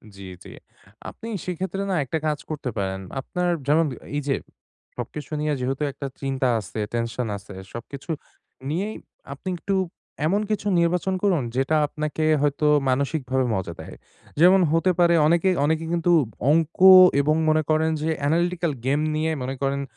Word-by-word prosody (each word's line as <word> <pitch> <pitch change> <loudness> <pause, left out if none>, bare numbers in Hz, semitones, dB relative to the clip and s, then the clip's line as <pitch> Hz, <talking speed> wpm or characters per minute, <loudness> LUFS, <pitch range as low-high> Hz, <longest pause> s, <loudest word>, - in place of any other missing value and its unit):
জি, 100 - -12 0.2
জি। - - -12 0.6
আপনি 225 - -10 0.2
সেই 180 - -3
ক্ষেত্রে 190 +1 -3
না - - +1
একটা 135 - -2
কাজ 150 -1 -1
করতে 150 -4 -4
পারেন। 95 -1 -2 0.2
আপনার 180 +6 -2 0.2
যেমন 160 +3 +4 0.3
এইযে 140 -1 0 0.6
সবকিছু 150 +1 -6
নিয়ে 150 0 0
যেহেতু 130 +3 -2
একটা 140 +1 -6
চিন্তা 135 -1 -1
আছে 105 +1 -7
টেনশন 115 +1 -2
আছে। 100 +1 -12 0.2
সবকিছু 135 +7 -9 0.6
নিয়েই 195 +8 -2 0.4
আপনি 165 +7 -7
একটু 195 +3 -2 0.5
এমন 195 +6 +2
কিছু 205 -1 -1
নির্বাচন 180 +2 +1
করুন 180 -9 +2
যেটা 135 +4 +1
আপনাকে 155 +1 -3 0.2
হয়তো 145 +1 +1 0.2
মানসিকভাবে 130 -1 0
মজা 90 -3 -3
দেয়। - - -9 0.4
যেমন 185 +3 +6
হতে 165 +3 +3
পারে 170 0 +5
অনেকে, 170 +3 +3 0.2
অনেকে, 160 +2 0
কিন্তু 175 +1 +1 0.4
অংক 160 0 +1 0.4
এবং 150 +2 +2
মনে 155 0 +3
করেন 155 +1 +2
যে, 160 - -1 0.2
এনালিটিকাল 170 +1 +1
গেম 140 +3 +2 0.2
নিয়ে 160 +1 0
মনে 130 +1 -3
করেন 140 0 0
155 Hz, 155 wpm, -24 LUFS, 135-170 Hz, 0.6 s, যেমন